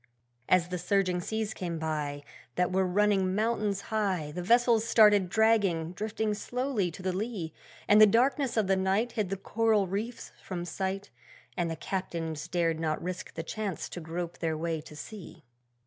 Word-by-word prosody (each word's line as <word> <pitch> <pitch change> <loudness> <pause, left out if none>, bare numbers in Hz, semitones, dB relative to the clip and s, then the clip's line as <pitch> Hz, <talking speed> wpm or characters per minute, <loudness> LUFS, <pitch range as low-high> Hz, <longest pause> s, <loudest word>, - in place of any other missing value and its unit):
As 180 -1 +4
the 180 -1 -3
surging 185 0 +1
seas 220 +3 -2
came 170 -4 -4
by, 150 -2 -3 0.3
That 180 0 +1
were 190 0 +2
running 190 0 +2
mountains 210 -2 0
high, 190 -8 0
The 180 - -4
vessels 235 +3 +4
started 210 -4 +5
dragging, 200 -7 +2
drifting 215 +2 -2
slowly 245 -2 -1
to 175 +3 -10
the 185 -1 0
lee; 190 -5 -3 0.3
And 210 +1 +7
the 215 - +10
darkness 250 +3 +2
of 220 - +3
the 195 0 +3
night 190 +5 +1
Hid 215 -5 -1
the 195 - -2
coral 220 +1 +2
reefs 210 +6 -4
from 175 -2 -5
sight, 190 +2 -3 0.4
And 175 -1 0
the 165 - -3
Captains 165 -3 -4
dared 170 -2 0
not 155 -1 -1
risk 180 +1 -6
the 165 - -3
chance 200 -1 -4
to - - -6
grope 170 +1 -5
their 160 -2 -1
way 165 -1 -2
to 150 - -13
sea. 175 -1 -10
190 Hz, 175 wpm, -29 LUFS, 170-215 Hz, 0.4 s, the